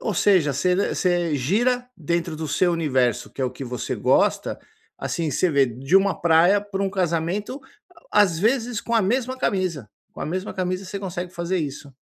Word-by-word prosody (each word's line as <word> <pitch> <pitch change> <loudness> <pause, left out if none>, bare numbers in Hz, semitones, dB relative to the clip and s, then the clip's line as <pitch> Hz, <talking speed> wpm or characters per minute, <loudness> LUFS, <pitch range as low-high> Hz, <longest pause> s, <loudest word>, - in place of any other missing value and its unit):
Ou 215 - -2
seja, 175 -6 +3
você 180 +7 +1 0.2
você 175 -3 +1
gira 240 - +1
dentro 170 0 -2
do 160 0 -4
seu 175 +4 +2
universo, 130 -7 0
que - - -8
é - - +2
o 125 - -1
que 130 +2 -8
você 125 -2 -4
gosta, - - +1 0.4
assim, 165 -3 -2
você 175 +6 +1
vê, 140 -3 +4
de 130 +8 +1
uma 195 0 +2
praia 170 +4 +5
pra 200 -1 -4
um 195 - 0
casamento, 185 - -1 0.5
a 210 - +6
às 175 -5 0
vezes, 230 +2 +1
com 235 - -3
a 225 - +4
mesma 250 +5 0
camisa, 180 - -1 0.2
com - - -11
a - - -3
mesma 185 +5 -4
camisa 185 +1 -2
você 195 +2 -5
consegue 180 -2 -5
fazer 175 +1 -2
isso. 140 -2 -5
175 Hz, 195 wpm, -23 LUFS, 155-200 Hz, 0.5 s, a